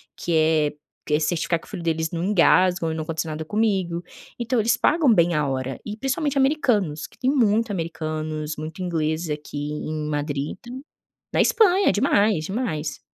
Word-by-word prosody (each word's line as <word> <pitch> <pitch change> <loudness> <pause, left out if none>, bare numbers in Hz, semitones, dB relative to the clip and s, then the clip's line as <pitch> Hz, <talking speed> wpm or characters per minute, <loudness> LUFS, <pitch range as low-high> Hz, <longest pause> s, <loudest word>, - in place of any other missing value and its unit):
que 175 - -3
é 155 -1 +3 0.3
que 150 - -1
é 150 - +4
certificar 165 +1 0
que - - -17
o - - -16
filho 185 -5 -6
deles 160 -1 0
não 170 +1 -3
engasgue 185 -2 +4
ou 165 - 0
não 160 - -3
aconteça 160 0 -3
nada 155 +1 -5
comigo. 190 -4 0 0.4
Então, 235 +1 0
eles 225 +1 +3
pagam 295 +1 +3
bem 170 -4 +3
a 150 -1 +1
hora, 130 0 -3
e 210 - -5
principalmente 270 +4 -1
americanos, 245 - +1
que - - -15
têm 260 - 0
muito 230 -4 +2
americanos, 155 -3 -3
muito 155 +4 -6
ingleses 160 -2 -1
aqui 150 0 -5 0.2
em 155 0 -4
Madrid, 145 -1 -2
enta 240 - -9 0.6
Na - - +2
Espanha, 400 -4 +4
é - - +4
demais, 205 - +2
demais, 175 -8 -3
170 Hz, 185 wpm, -23 LUFS, 155-220 Hz, 0.6 s, é